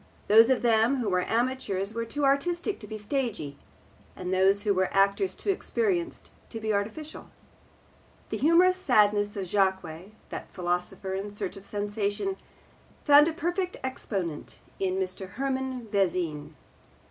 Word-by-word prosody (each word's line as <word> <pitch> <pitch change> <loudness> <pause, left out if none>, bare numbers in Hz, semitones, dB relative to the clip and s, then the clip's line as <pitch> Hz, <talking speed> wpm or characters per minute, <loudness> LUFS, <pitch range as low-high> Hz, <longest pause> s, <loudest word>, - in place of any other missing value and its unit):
Those 225 +3 +7
of 260 -2 +2
them 230 +2 +4
who 240 -6 -1
were 180 -1 0
amateurs 225 -5 -1
were 230 0 -2
too 285 +5 -2
artistic 345 +8 +1
to 210 - -10
be 215 - -6
stagey, 210 - -3 0.6
and 180 0 -4
those 195 +2 +3
who 205 -2 +2
were 190 0 0
actors 200 - +2
too 400 - -1
experienced 375 -4 -2 0.2
to 225 - -6
be 220 -1 -1
artificial. 220 +10 -4 1.0
The - - -2
humorous 350 +5 +5
sadness 210 - +3
of 195 -2 -3
Jaques, 190 -2 -1 0.2
that - - -7
philosopher 180 +2 -2
in 195 +2 -3
search 205 -2 -5
of 195 0 -11
sensation, 205 - -2 0.7
found 290 0 +8
a - - +1
perfect 350 +3 -2
exponent 195 - -4 0.2
in 185 -1 0
Mr. 190 0 -4
Hermann 265 -2 -3
Vezin. 170 -6 -1
210 Hz, 145 wpm, -27 LUFS, 190-275 Hz, 1.0 s, found